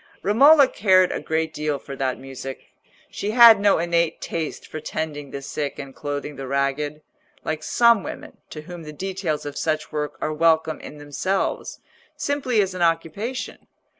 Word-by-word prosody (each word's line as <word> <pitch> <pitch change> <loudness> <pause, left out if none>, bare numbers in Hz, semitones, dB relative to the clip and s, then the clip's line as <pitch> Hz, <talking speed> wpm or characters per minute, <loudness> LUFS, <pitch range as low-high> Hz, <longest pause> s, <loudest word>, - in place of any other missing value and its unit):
Romola 275 +8 +7
cared 185 -6 +3
a - - -2
great 160 0 -1
deal 150 -1 -1
for 140 0 -9
that 130 -1 -1
music. 135 0 -9 0.4
She 205 - -4
had 230 -2 +8
no 200 0 +4
innate 170 -1 0
taste 160 -2 -4
for 155 - -7
tending 150 -2 -5
the 140 +1 -7
sick 145 +1 -4
and 140 -2 -8
clothing 145 0 -5
the 135 -1 -6
ragged, 140 +2 -1 0.4
like 155 0 -3
some 235 +5 +4
women - - -9
to 155 - -8
whom 175 +2 -9
the 150 -1 -9
details 185 -3 -3
of 145 - -6
such 155 0 -2
work 150 -1 -3
are 155 - -2
welcome 160 0 +2
in 150 - -10
themselves, 145 +7 -2 0.4
simply 260 -7 +1
as 190 -1 -4
an 180 - -5
occupation. 170 +9 -2
160 Hz, 165 wpm, -23 LUFS, 145-190 Hz, 0.4 s, had